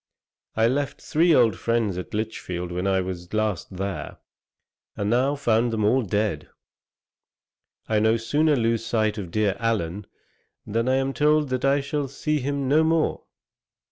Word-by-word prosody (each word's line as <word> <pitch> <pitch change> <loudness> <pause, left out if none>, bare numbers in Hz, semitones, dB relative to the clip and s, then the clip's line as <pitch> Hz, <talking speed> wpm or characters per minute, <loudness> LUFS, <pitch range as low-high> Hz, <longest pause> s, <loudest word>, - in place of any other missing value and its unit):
I 110 +1 +3
left 140 +3 -1
three 170 +3 +2
old 115 -6 +4
friends 115 -5 0
at 90 +3 -6
Lichfield 90 -5 -4
when 90 +2 -2
I 95 -1 +2
was 90 -1 -6
last 105 -4 -2
there, 95 0 -4 0.8
and 100 +1 -1
now 130 +4 +2
found 120 -4 +1
them 110 -2 0
all 125 +5 +3
dead. 105 -1 -2 1.4
I 110 -1 +2
no 110 +2 +3
sooner 145 +7 +2
lose 115 -2 0
sight 110 -2 0
of 95 -4 -6
dear 105 +1 +1
Allen, 105 -4 -2 0.6
than 115 +4 -1
I 130 - +3
am 135 0 0
told 150 0 +2
that 130 -1 -2
I 140 +1 +3
shall 145 0 -2
see 150 +3 -2
him 140 0 -2
no 150 +4 +4
more. 160 0 0
115 Hz, 160 wpm, -24 LUFS, 105-135 Hz, 1.4 s, old